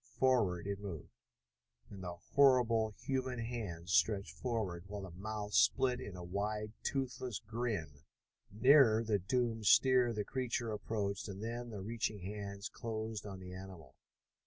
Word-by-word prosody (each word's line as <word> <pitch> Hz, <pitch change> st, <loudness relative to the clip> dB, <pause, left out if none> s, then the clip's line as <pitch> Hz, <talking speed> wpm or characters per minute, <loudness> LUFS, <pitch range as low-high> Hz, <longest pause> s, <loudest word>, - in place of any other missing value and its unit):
Forward 110 Hz, -10 st, +3 dB
it 100 Hz, 0 st, -3 dB
moved, 95 Hz, -11 st, -7 dB, 0.8 s
and 100 Hz, -2 st, -8 dB
the 90 Hz, -1 st, -4 dB, 0.2 s
horrible 120 Hz, -6 st, +4 dB
human 130 Hz, -2 st, -1 dB
hands 105 Hz, -8 st, -4 dB
stretched 100 Hz, -2 st, +2 dB
forward, 105 Hz, -8 st, -2 dB
while 100 Hz, 0 st, -6 dB
the 95 Hz, -, -7 dB
mouth 105 Hz, +3 st, -5 dB
split 130 Hz, -2 st, +4 dB
in 100 Hz, -, -7 dB
a 90 Hz, -, -7 dB
wide, 105 Hz, +4 st, -2 dB
toothless 130 Hz, -4 st, -2 dB
grin. 105 Hz, -, -3 dB, 0.5 s
Nearer 115 Hz, 0 st, +6 dB
the 105 Hz, -2 st, +1 dB
doomed 115 Hz, +2 st, 0 dB
steer 125 Hz, 0 st, +6 dB
the 105 Hz, -2 st, -2 dB
creature 125 Hz, -3 st, -2 dB
approached, 105 Hz, -1 st, -2 dB
and 100 Hz, +1 st, -6 dB
then 120 Hz, +1 st, -4 dB
the 105 Hz, -4 st, -6 dB
reaching 110 Hz, -1 st, -2 dB
hands 100 Hz, +1 st, -5 dB
closed 110 Hz, -2 st, -5 dB
on 95 Hz, -2 st, -7 dB
the 90 Hz, 0 st, -9 dB
animal. 90 Hz, -7 st, -10 dB
105 Hz, 145 wpm, -35 LUFS, 100-120 Hz, 0.8 s, Nearer